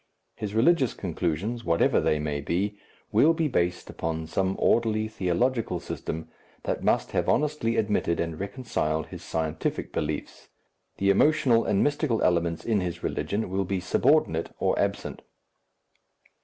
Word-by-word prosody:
His 105 -1 -5
religious 130 +2 +3
conclusions, 95 +6 -2
whatever 85 -6 +3
they 75 - +2
may 75 -1 -2
be, 95 +8 -1 0.4
will 160 +3 +5
be 165 -1 0
based 90 -9 0
upon 80 -1 -3
some 95 +4 0
orderly 110 -2 +2
theological 110 +1 0
system 80 -1 -5 0.4
that - - -2
must - - +1
have - - 0
honestly 145 -6 +1
admitted 105 -5 +1
and 85 -2 -2
reconciled 100 - -2
his - - -8
scientific 80 -1 -3
beliefs; 75 -1 -4 0.5
the 100 0 +3
emotional 125 0 +4
and 100 - +2
mystical 145 -5 +1
elements 85 -1 +1
in 110 -4 +2
his 85 -1 -4
religion 105 +2 -2
will 95 +1 -1
be 95 0 -2
subordinate 90 - +2
or - - +1
absent. - - -2
100 Hz, 140 wpm, -27 LUFS, 85-115 Hz, 0.5 s, will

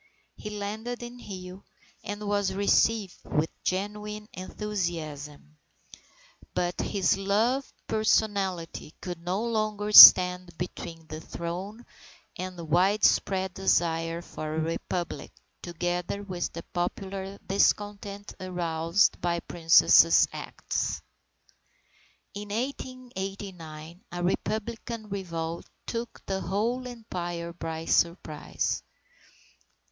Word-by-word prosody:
He 210 - -7
landed 215 +4 -5
in 240 +1 -8
Rio, 185 -4 -9 0.4
and 205 0 -5
was 205 -2 +1
received 200 0 +2
with 155 +2 -1
genuine 210 +2 -3
enthusiasm. 160 -7 -5 1.0
But 175 0 -1
his 195 -2 +1
loved 225 +7 +1
personality 200 -7 0
could 175 -2 -6
no 185 +5 -1
longer 215 -2 -1
stand 180 -4 +10
between 165 -2 -6
the 155 0 -7
throne 185 +9 -6 0.5
and 185 0 -6
the 170 - -6
widespread 190 +2 +2
desire 165 -3 +1
for 155 -1 -5
a - - 0
Republic 165 +2 -3 0.3
together 175 +3 -3
with 180 -3 -3
the 170 - -7
popular 190 +2 -4
discontent 205 +1 0
aroused 170 0 +1
by 175 0 +1
the - - -5
Princess's 165 -1 +6
acts. - - -3 1.3
In 205 +1 -7
1889, 195 - -6
a 175 0 -4
Republican 220 +3 -3
revolt 170 -4 -4 0.2
took 235 0 -5
the 190 -1 -2
whole 230 +8 -1
Empire 175 -8 -5
by 160 -1 -5
surprise. 170 -3 0
190 Hz, 100 wpm, -28 LUFS, 170-210 Hz, 1.3 s, stand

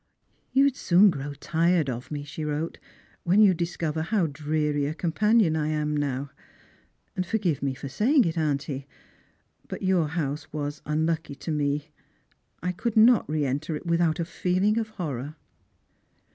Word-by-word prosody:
" - - -42
You 270 - +4
would 280 -1 +1
"oon 190 +3 +7
grow 145 -2 -5
tired 165 +2 +1
of 125 -1 -5
me," 145 -1 -4
she 150 +2 -7
wrote, 150 +2 -3 0.2
" - - -29
'/hen 190 +4 +5
you 205 -3 +7
discover 165 -2 -2
how 190 +2 +1
dreary 150 -1 -1
a 155 - -3
companion 200 +1 +2
I 155 -1 0
now 145 -2 0
am. - - -17 0.9
And 185 - 0
forgive 185 -6 -1
me 135 -1 -1
for 140 - -7
saying 245 - +3
it, 165 -1 -1
auntie, 145 -3 -2 0.8
but - - -6
your 185 -4 +2
house 150 -2 -3
was 145 -1 -4
unlucky 160 -1 -1
to 160 - -5
me. 145 0 -1 0.7
I 180 - 0
could 225 +5 -3
not 225 -3 +6
re 150 -1 0
enter 145 +4 -2
it 150 - -7
without 170 -1 +1
a 170 - 0
feeling 185 +5 +1
of 220 -1 -3
horror." 150 - -5
160 Hz, 170 wpm, -26 LUFS, 145-180 Hz, 0.9 s, oon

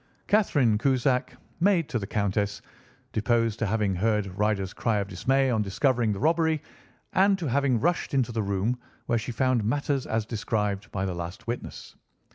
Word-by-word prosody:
Catherine 145 - +3
Cusack, 130 0 +1 0.2
maid 175 -4 +3
to 120 - -1
the 100 - -5
Countess, 100 0 -1 0.5
deposed 115 0 +1
to 115 - 0
having 105 -1 +1
heard 100 0 0
Ryder's 100 -2 0
cry 115 -3 0
of 100 -1 -1
dismay 130 +8 +1
on 110 -3 +1
discovering 115 +3 +1
the 100 - -3
robbery, 160 +1 +2 0.5
and 195 +1 +4
to 175 - -4
having 135 -2 +2
rushed 175 +6 0
into 125 -3 +1
the 115 -1 -1
room, 100 +5 -1 0.3
where 120 - +1
she 120 +3 -5
found 125 0 +1
matters 140 +4 0
as 110 -1 -1
described 105 -3 -2
by 95 -1 -2
the 95 - -2
last 85 +3 -6
witness. 120 +1 -6
115 Hz, 170 wpm, -27 LUFS, 105-135 Hz, 0.5 s, and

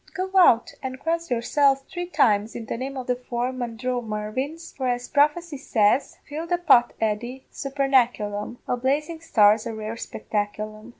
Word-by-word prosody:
Go 375 0 -3
out 280 -10 +5
and 260 -1 -5
cross 335 +2 -2
yourselves 270 +3 +2
three 355 0 -5
times 220 - +2
in 230 - -5
the - - -4
name 265 +3 -5
o' 260 - -3
the 250 0 0
four 245 0 -3
Mandromarvins, 245 +4 -4
for 260 -2 -2
as 245 0 -1
prophecy 300 +2 +1
says: 235 -1 +1
Fill 310 +3 -5
the 350 +1 +1
pot, 280 -9 +4
Eddy, 235 +4 -2
supernaculum 245 -6 0
a - - +1
blazing 300 +6 -1
star's 215 -8 +4
a 225 - -4
rare 215 0 -5
spectaculum. 215 +1 -4
250 Hz, 160 wpm, -24 LUFS, 225-290 Hz, -, out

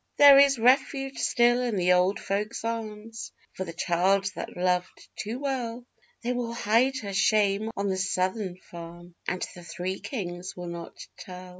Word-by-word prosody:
There 285 -1 +10
is 280 -1 +6
refuge 270 +3 +2
still 240 +1 +3
in 240 -3 -1
the 180 -1 +3
old 180 +2 +2
folks' 210 +3 -3
arms 225 -1 -5 0.2
for 190 - -4
the 170 - -6
child 190 +4 +1
that - - -7
loved 180 0 -1
too 220 +2 -4
well; 250 -4 -3 0.4
They 245 +1 0
will 240 -1 -3
hide 235 +5 +2
her 200 -1 -5
shame 205 +1 +2
on 200 0 0
the 190 -1 0
Southern 185 0 -1
farm 175 0 -11
and 185 - -1
the 175 -2 -11
Three 180 +2 -4
Kings 185 -6 -5
will 175 -1 -5
not 170 0 -8 0.2
tell. 180 0 -9
200 Hz, 165 wpm, -27 LUFS, 180-235 Hz, 0.4 s, There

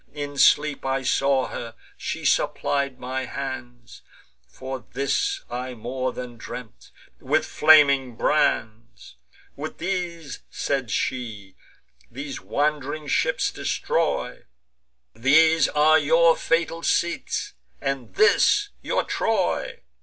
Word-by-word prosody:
In 145 -1 -5
sleep 150 -1 +4
I 135 0 -1
saw 135 0 +2
her; 115 -1 -7 0.2
she - - -5
supplied 140 -2 0
my 130 +1 -3
hands 120 -3 -7 0.5
(For 130 - -7
this 390 - -1
I 125 +1 -5
more 130 +3 -3
than 125 -1 -8
dreamt) 115 0 -10 0.3
with 150 +4 +1
flaming 140 -5 +5
brands: 115 -4 -1 0.4
'With 155 +2 -7
these,' 170 -5 -4
said 135 -4 -2
she, 105 -5 -3 0.5
'these 140 +2 -7
wand'ring 150 0 -2
ships 145 - +1
destroy: - - -2 0.7
These 160 +7 +4
are 155 +1 +4
your 165 +2 +4
fatal 165 0 0
seats, 170 0 -1 0.3
and 135 -2 -4
this 415 -1 +4
your - - 0
Troy. - - -1
140 Hz, 105 wpm, -24 LUFS, 125-155 Hz, 0.7 s, flaming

